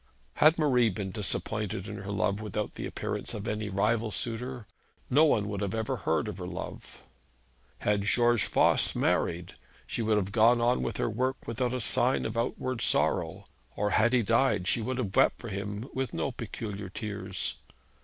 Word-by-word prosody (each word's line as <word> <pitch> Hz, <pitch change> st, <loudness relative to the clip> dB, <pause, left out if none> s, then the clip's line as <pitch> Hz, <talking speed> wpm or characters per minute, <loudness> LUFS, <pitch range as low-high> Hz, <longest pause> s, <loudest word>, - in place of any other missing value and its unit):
Had 155 Hz, +3 st, +6 dB
Marie 125 Hz, -7 st, +3 dB
been 95 Hz, -1 st, -4 dB
disappointed 105 Hz, 0 st, -1 dB
in 105 Hz, 0 st, -6 dB
her 100 Hz, +1 st, -6 dB
love 100 Hz, 0 st, 0 dB
without 105 Hz, 0 st, -3 dB
the -, -, -5 dB
appearance -, -, -4 dB
of 105 Hz, +1 st, -5 dB
any 105 Hz, -2 st, -2 dB
rival 110 Hz, +4 st, +1 dB
suitor, 120 Hz, +2 st, -4 dB, 0.5 s
no 150 Hz, +5 st, +6 dB
one 105 Hz, -9 st, +2 dB
would 100 Hz, -1 st, -3 dB
have 100 Hz, +1 st, -2 dB
ever 110 Hz, +4 st, -1 dB
heard 80 Hz, -6 st, 0 dB
of -, -, -6 dB
her -, -, -5 dB
love. -, -, -8 dB, 0.7 s
Had 105 Hz, -1 st, +1 dB
George 120 Hz, +1 st, +3 dB
Voss -, -, +3 dB
married, 85 Hz, 0 st, 0 dB, 0.3 s
she -, -, -3 dB
would 110 Hz, -1 st, +2 dB
have 100 Hz, -1 st, -1 dB
gone 115 Hz, +2 st, +5 dB
on 120 Hz, +1 st, +2 dB
with -, -, -3 dB
her -, -, 0 dB
work 130 Hz, +4 st, -2 dB
without 120 Hz, +2 st, -1 dB
a 130 Hz, -, -2 dB
sign 125 Hz, +2 st, +2 dB
of 110 Hz, -, -3 dB
outward 115 Hz, +1 st, -2 dB
sorrow; -, -, +1 dB, 0.3 s
or 105 Hz, 0 st, 0 dB
had 120 Hz, +2 st, +4 dB
he 125 Hz, -2 st, +3 dB
died, 115 Hz, -3 st, +2 dB
she 115 Hz, -, +2 dB
would 130 Hz, +3 st, -2 dB
have 105 Hz, -7 st, -3 dB
wept -, -, +4 dB
for 115 Hz, -, -7 dB
him 100 Hz, +3 st, -4 dB
with 130 Hz, -1 st, -3 dB
no 135 Hz, -, -1 dB
peculiar 105 Hz, -4 st, -6 dB
tears. 95 Hz, -2 st, -4 dB
110 Hz, 185 wpm, -29 LUFS, 100-120 Hz, 0.7 s, Had